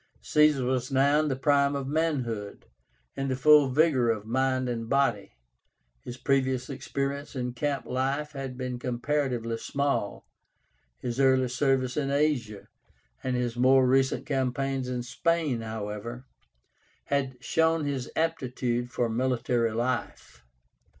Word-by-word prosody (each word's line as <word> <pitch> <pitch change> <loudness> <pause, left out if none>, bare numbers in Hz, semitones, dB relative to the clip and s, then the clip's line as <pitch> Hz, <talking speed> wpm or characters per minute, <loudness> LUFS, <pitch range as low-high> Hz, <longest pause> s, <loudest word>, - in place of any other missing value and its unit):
Caesar 150 -4 +3
was 130 +1 -1
now 140 +2 +4
in 155 - +1
the 135 - 0
prime 140 +1 +2
of 140 -1 -3
manhood, 130 -10 -2 0.5
in 135 - -2
the 130 - 0
full 145 +1 +6
vigor 130 -3 +3
of 110 -2 -1
mind 130 +2 0
and 115 -2 -4
body. 135 - +1 0.7
His 125 - -7
previous 130 0 0
experience 140 +1 -4
in 125 -1 -3
camp 140 +2 -2
life 135 +4 -1
had 135 -3 -6
been 125 -1 -4
comparatively 125 -2 -1
small. 140 -7 -2 0.7
His 120 +1 -4
early 130 -2 +4
service 130 0 0
in 140 -2 0
Asia, 140 -8 0 0.6
and 130 -1 -1
his 120 -1 -1
more 130 +1 +5
recent 135 +1 +2
campaigns 135 -1 -1
in 125 -1 -3
Spain, 140 +1 0
however, 110 +3 -6 0.8
had 135 -2 -1
shown 160 +3 +1
his 135 -3 -3
aptitude 125 -6 -1
for 120 -1 0
military 120 0 0
life. 120 - -3
130 Hz, 130 wpm, -27 LUFS, 120-140 Hz, 0.8 s, full